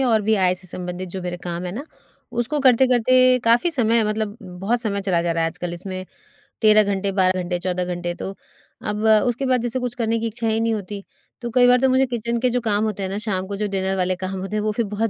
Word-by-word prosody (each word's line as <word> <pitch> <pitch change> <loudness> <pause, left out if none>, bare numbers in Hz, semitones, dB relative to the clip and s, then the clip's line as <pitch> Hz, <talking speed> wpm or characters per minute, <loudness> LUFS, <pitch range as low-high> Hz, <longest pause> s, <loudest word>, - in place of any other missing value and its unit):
या 260 - +2
और 220 -2 +3
भी 220 +1 +2
आय 185 -2 +3
से 185 0 -9
संबंधित 180 +1 -5
जो 190 +2 -6
मेरे 175 0 -4
काम 175 0 -4
है 175 - -4
ना, 270 +8 -5 0.5
उसको 240 +5 -1
करते-करते 255 0 +5
काफ़ी 235 +9 +4
समय 235 -6 +3
मतलब 215 0 -2
उम, 180 -1 -10
बहुत 235 +5 +1
समय 200 -3 -1
चला 185 -4 +1
जा 170 - 0
रहा 165 0 0
है 165 - +1
आजकल 175 +1 -6
इसमें 185 +1 -6 0.6
13 215 -1 +6
घंटे, 200 0 -1
12 185 -1 +2
घंटे, 175 0 -2
14 180 0 -2
घंटे 175 0 -3
तो, 195 - -5 0.5
अब 210 0 -3 0.2
उसके 245 +3 -1
बाद 255 -2 +2
जैसे 245 +2 -2
कुछ 245 -1 -3
करने 230 -1 0
की 230 - -1
इच्छा 225 +1 -3
ही 220 0 +1
नहीं 225 0 +1
होती। 200 -1 -5 0.4
तो 240 - -3
कई 245 +1 +5
बार 250 0 +5
तो 265 - +4
मुझे 260 +1 +4
किचन 235 -1 -2
के 250 +1 +2
जो 245 0 0
काम 215 -2 +1
होते 205 -2 -3
हैं 190 - -2
ना, 195 - -3
शाम 190 -3 -2
को 200 - -4
जो 210 0 -1
डिनर 190 -1 -1
वाले 185 0 +1
काम 185 +1 -5
होते 195 +3 -4
हैं 210 - 0
वो 215 - +1
फिर 230 +1 -1
बहुत 210 +2 -1
210 Hz, 260 wpm, -22 LUFS, 185-235 Hz, 0.6 s, 13